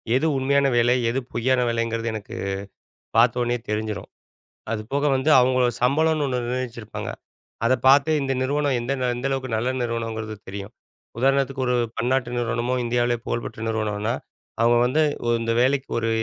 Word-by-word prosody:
எது 135 - +2
உண்மையான 140 +1 +2
வேலை, 120 +1 +4
எது 130 - 0
பொய்யான 130 +1 +2
வேலைங்கிறது 115 0 -1
எனக்கு 105 -2 -7 0.8
பார்த்த 120 +1 +4
உடனேயே 120 0 -1
தெரிஞ்சிரும். 105 -2 -3 0.6
அதுபோக 115 +7 -2
வந்து 140 +4 +1
அவுங்க 125 0 +3
சம்பளம்னு 155 +4 +2
ஒன்னு 125 -1 -1
நிர்ணயிச்சிருப்பாங்க. 120 -3 -4 0.6
அத 130 - +3 0.2
பார்த்து 140 +3 +6
இந்த 135 0 -1
நிறுவனம் 140 0 +1
எந்த 120 +3 -2 0.2
எந்தளவுக்கு 130 -2 -2
நல்ல 120 +3 -1
நிறுவனம்ங்கிறது 115 -2 -3
தெரியும். 100 +2 -7 0.5
உதாரணத்துக்கு 135 0 +1
ஒரு 125 - +2 0.2
பன்னாட்டு 125 +1 0
நிறுவனமோ 120 +1 -1
இந்தியாலயே 120 0 +1
புகழ்பெற்ற 115 -1 -4
நிறுவனனா, 110 +1 -1 0.5
அவுங்க 120 0 +5
வந்து 150 +5 +2 0.2
உ - - 0
இந்த 115 0 0
வேலைக்கு 135 +1 +1
ஒரு 115 - -1
120 Hz, 140 wpm, -23 LUFS, 115-135 Hz, 0.8 s, பார்த்து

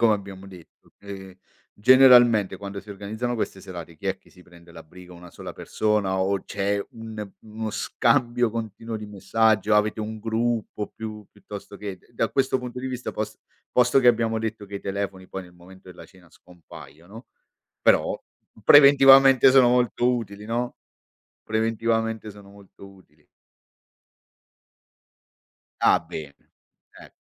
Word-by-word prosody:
come 115 -2 +4
abbiamo 100 -1 -9
detto. 90 -4 -17
Ehm 95 -2 -10 0.4
generalmente 120 -3 +5
quando 100 0 -7
si 105 - -14
organizzano 110 +5 -4
queste 95 -4 -4
serate 85 -4 -9
chi 100 - -9
è 95 0 -1
che - - -25
prende 85 -1 -18
la 80 - -11
briga 90 +2 -15
1 85 0 -13
sola - - -10
persona 105 -3 -1
o 95 0 0
c'è 100 0 -2
un 110 -2 -8
uno 110 0 -6
scambio 120 +2 +1
continuo 115 0 -6
di 105 -1 -8
messaggio? 105 +1 +1
Avete 105 +1 +1
un 110 0 -5
gruppo 115 -1 -2
piu 110 -2 -8
piuttosto 100 0 -11
che 100 -2 -6
d - - -29
da 115 -1 -1
questo 130 +3 0
punto 125 0 -7
di 130 +1 -4
vista 125 -1 -5
pos 110 - -5 0.3
posto 125 +2 +3
che 125 - +1
abbiamo 115 -1 +2
detto 110 -2 -5
che 100 - -11
i - - -8
telefoni 95 -1 -5
poi 95 - -6
nel 90 - -17
momento 95 +1 -17
della 90 - -13
cena 95 -2 -20
scompaiono, 90 - -15 0.6
però - - +2 0.5
preventivamente 135 -2 +7
sono 130 -2 +6
molto 125 0 +2
utili, 105 -3 -7
no, 120 +2 -3 0.7
preventivamente 115 0 -1
sono 100 -1 -14
molto 100 -1 -16
utili. 80 -6 -23 2.6
Ah - - +5
bene, 75 -3 -11 0.5
eh. - - -15
105 Hz, 145 wpm, -24 LUFS, 95-115 Hz, 2.6 s, preventivamente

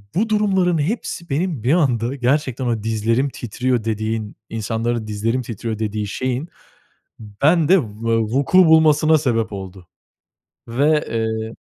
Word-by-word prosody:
bu 220 +4 +1
durumların 190 -5 +2
hepsi 170 -1 -3
benim 150 - -2
bir 130 +6 +3
anda 130 -6 +1
gerçekten 130 0 0
ama 115 -3 -1
dizlerim 115 +5 0
titriyor 125 0 -2
dediğin, 110 -1 -3
insanların 115 +1 -2
dizlerim 115 +4 -1
titriyor 115 -1 -5
dediği 105 -1 -2
şeyin 130 - -3 0.9
bende 165 +4 +5
v - - -5
eee, 115 +2 -2
vuku 135 +11 +2
bulmasına 160 -1 +5
sebep 115 -7 -1
oldu 95 -2 -9 0.8
ve, 150 +6 +2
eee 110 0 -2
120 Hz, 130 wpm, -20 LUFS, 110-150 Hz, 0.9 s, bende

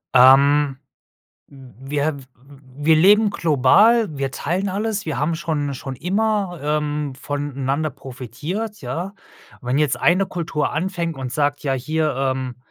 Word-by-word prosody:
Ähm, 135 +2 +6 0.7
w 135 -1 -15
wir 145 +1 0
w - - -11
w - - -16 0.6
wir 160 0 +6
leben 205 +6 +5
global. 200 - +4
Wir 135 -1 -2
teilen 190 +7 -2
alles. 210 0 -2
Wir 155 - -3
haben 160 +3 0
schon 150 -4 -2
schon 135 0 -6
immer, 195 - -1
ähm, 150 -1 -1
voneinander 145 +1 -2
profitiert, 145 - -6
ja? 165 +11 -4 0.5
Wenn 125 +1 -1
jetzt 150 -3 +1
eine 185 +3 +3
Kultur 165 -4 -2
anfängt 170 -1 -2
und 130 -2 -5
sagt: 145 +1 -1
„Ja, 135 -2 0
hier, 155 +2 -1
ähm, 130 -2 -2
150 Hz, 140 wpm, -21 LUFS, 135-175 Hz, 0.7 s, Ähm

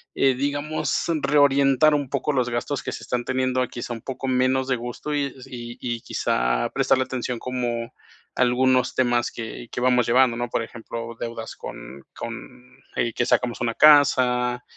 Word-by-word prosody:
eh, 135 -1 +3
digamos, 145 +3 -1 0.2
reorientar 140 +1 +4
un 145 -3 -1
poco 140 +2 -1
los 125 -3 +1
gastos 120 +4 -2
que - - -4
se - - -7
están 120 -1 -2
teniendo 130 0 0
a, 125 - 0
quizá, 120 0 -6
un 115 - -7
poco 135 +2 -5
menos 130 +1 +2
de 130 -2 +1
gustos, 120 +5 -5
y 145 -1 +1
s 130 -1 -12
y 120 -1 -7
y, 120 -2 -3
quizá, - - 0
prestarle 130 0 +2
atención 125 -2 -4
como 120 -2 -3 0.4
a - - -1
algunos 125 0 +3
temas 120 -2 +2
que 115 +1 -7
que 125 - -4
vamos 125 -2 +3
llevando, 120 0 +4
¿no? 120 0 -3
Por 115 - -1
ejemplo, 115 0 -7
deudas 115 -1 -6
con - - -9
con, 125 +2 -9 0.2
eh, 115 -2 0
que 120 - 0
sacamos 120 -1 +1
una 115 -1 -1
casa, 125 -4 +5
125 Hz, 180 wpm, -24 LUFS, 120-130 Hz, 0.4 s, casa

